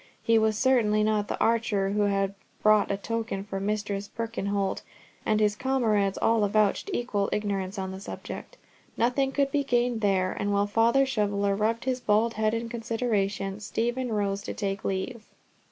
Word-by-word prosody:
He 230 -1 +4
was 220 -1 +2
certainly 215 -5 +3
not 210 -1 +1
the - - -3
archer 220 -4 +1
who 205 0 +2
had 195 -1 0 0.3
brought 215 -1 +5
a 200 - 0
token 225 -1 -3
for 195 -1 -5
Mistress 205 0 -2
Birkenholt, 205 -4 -2 0.5
and 215 0 +3
his 210 -1 +2
comrades 215 -6 +1
all 225 -1 +3
avouched 210 - +2
equal 215 - -1
ignorance 200 -2 -2
on 190 -1 -3
the 190 - -7
subject. - - -8 0.4
Nothing 260 +3 +2
could 275 0 +1
be 285 0 +1
gained 240 -3 +1
there, 190 -3 +2
and 205 - -2
while 200 0 +2
Father 230 +6 +3
Shoveller 205 -5 0
rubbed 220 +4 0
his 255 -1 0
bald 225 0 +2
head 215 0 +1
in 230 0 -3
consideration, 220 -4 -2
Stephen 240 +4 -2
rose 200 -2 -1
to - - -6
take 195 -2 -3
leave. 215 +4 -3
215 Hz, 170 wpm, -27 LUFS, 200-230 Hz, 0.5 s, brought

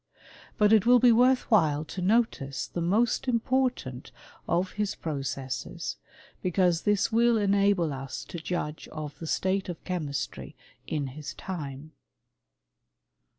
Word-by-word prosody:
But 210 -1 +5
it 220 0 +4
will 250 0 +8
be 245 0 +6
worth 250 +3 +5
while 155 -7 +3
to 185 - -6
notice 185 - +1
the 175 - -5
most 215 +9 +1
important 245 - 0 0.4
of 185 +2 +1
his 210 -1 -2
processes, 135 -4 -4 0.4
because 180 -2 +2
this 205 +1 +1
will 235 +1 +4
enable 200 -5 +2
us 135 -1 -6
to 170 - -7
judge 160 -2 -4
of 155 -2 -7
the 165 - -6
state 190 +3 0
of 175 - -6
chemistry 155 -6 -4 0.3
in 140 -4 -3
bis 150 -2 -7
time. 150 -4 -6
180 Hz, 130 wpm, -28 LUFS, 150-215 Hz, 0.4 s, will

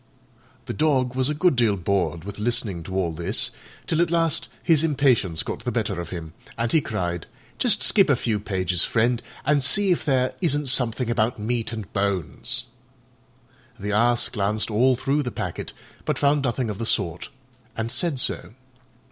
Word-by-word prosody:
The - - -4
Dog 130 -1 +1
was 130 +1 0
a 150 - -1
good 175 0 +3
deal 115 -5 +2
bored 85 -4 -1
with 100 +2 -8
listening 105 -5 0
to 95 - -6
all 90 -3 0
this, 85 +1 0 0.3
till 165 +1 +1
at 170 - +2
last 165 -2 +1
his 160 -2 +4
impatience 130 - +2
got - - -4
the - - -2
better 85 - -1
of 85 - -7
him, 80 -3 -7 0.2
and 115 0 -1
he 160 - +4
cried, 90 - -3 0.3
"Just - - +4
skip - - +5
a - - +5
few 110 -3 -1
pages, 95 -4 0
friend, 120 +1 +1 0.2
and 145 0 +3
see 195 +8 +4
if 175 - +1
there 130 -3 +1
isn't 145 -5 +1
something 125 -1 +1
about 120 0 +1
meat 115 +2 -2
and 110 -5 -7
bones." 100 -5 -1 1.1
The 105 +1 -3
Ass 120 +3 +3
glanced 105 +1 -1
all 125 +5 +4
through 135 +4 0
the 125 - -3
packet, - - -5 0.3
but - - -1
found 145 0 +2
nothing 120 -2 -1
of 100 - -7
the 115 - -2
sort, 85 0 -1 0.5
and 115 +1 -2
said 145 +3 0
so. 105 -3 -1
115 Hz, 180 wpm, -24 LUFS, 100-135 Hz, 1.1 s, skip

